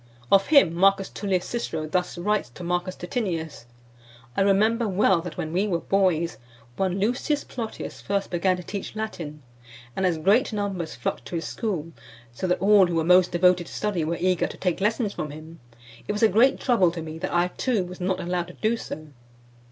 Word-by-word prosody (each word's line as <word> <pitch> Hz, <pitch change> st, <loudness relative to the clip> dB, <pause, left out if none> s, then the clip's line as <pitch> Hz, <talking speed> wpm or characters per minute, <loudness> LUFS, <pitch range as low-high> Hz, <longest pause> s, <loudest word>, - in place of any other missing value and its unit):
Of 195 Hz, 0 st, +5 dB
him 280 Hz, -, +5 dB
Marcus 195 Hz, +2 st, +3 dB
Tullius 190 Hz, -3 st, -1 dB
Cicero 165 Hz, -10 st, -3 dB
thus 180 Hz, +3 st, -2 dB
writes 205 Hz, -4 st, 0 dB
to -, -, -8 dB
Marcus 175 Hz, +1 st, -1 dB
Titinnius: 165 Hz, -, -4 dB, 0.7 s
"I -, -, +1 dB
remember 215 Hz, +4 st, +3 dB
well 190 Hz, -2 st, +3 dB
that 175 Hz, -1 st, -8 dB
when 160 Hz, +1 st, -4 dB
we 195 Hz, +4 st, +1 dB
were 180 Hz, -4 st, +1 dB
boys, 175 Hz, -2 st, +1 dB, 0.4 s
one 190 Hz, +3 st, 0 dB
Lucius 250 Hz, +8 st, 0 dB
Plotius 230 Hz, -3 st, -6 dB
first 200 Hz, 0 st, -2 dB
began 180 Hz, +1 st, +1 dB
to 180 Hz, -, -7 dB
teach 200 Hz, +3 st, -6 dB
Latin; 165 Hz, -9 st, -5 dB, 0.5 s
and 190 Hz, -, -1 dB
as 170 Hz, -3 st, 0 dB
great 205 Hz, -, +3 dB
numbers 195 Hz, -, -3 dB
flocked 120 Hz, +1 st, -3 dB
to 145 Hz, -, -6 dB
his 165 Hz, -2 st, -2 dB
school, 175 Hz, -8 st, -3 dB, 0.4 s
so 185 Hz, -, -3 dB
that 180 Hz, -, +1 dB
all 200 Hz, 0 st, +6 dB
who 175 Hz, -, -2 dB
were 165 Hz, -, +2 dB
most 180 Hz, +2 st, +5 dB
devoted 175 Hz, 0 st, +3 dB
to -, -, -11 dB
study 205 Hz, -6 st, -1 dB
were 165 Hz, +2 st, -1 dB
eager 185 Hz, -1 st, +1 dB
to -, -, -10 dB
take 180 Hz, -1 st, -1 dB
lessons 210 Hz, 0 st, 0 dB
from 155 Hz, -, -4 dB
him, 155 Hz, +3 st, -11 dB, 0.5 s
it -, -, -1 dB
was 210 Hz, -, -1 dB
a -, -, +8 dB
great 230 Hz, +7 st, +4 dB
trouble 230 Hz, -9 st, +3 dB
to 165 Hz, -1 st, -6 dB
me 160 Hz, 0 st, -7 dB
that -, -, -3 dB
I 175 Hz, +1 st, +2 dB
too 230 Hz, -1 st, 0 dB
was 180 Hz, +1 st, -9 dB
not 185 Hz, +1 st, 0 dB
allowed 175 Hz, -1 st, -2 dB
to 180 Hz, -, -11 dB
do 225 Hz, +4 st, 0 dB
so. 155 Hz, -7 st, -8 dB
185 Hz, 200 wpm, -25 LUFS, 170-205 Hz, 0.7 s, a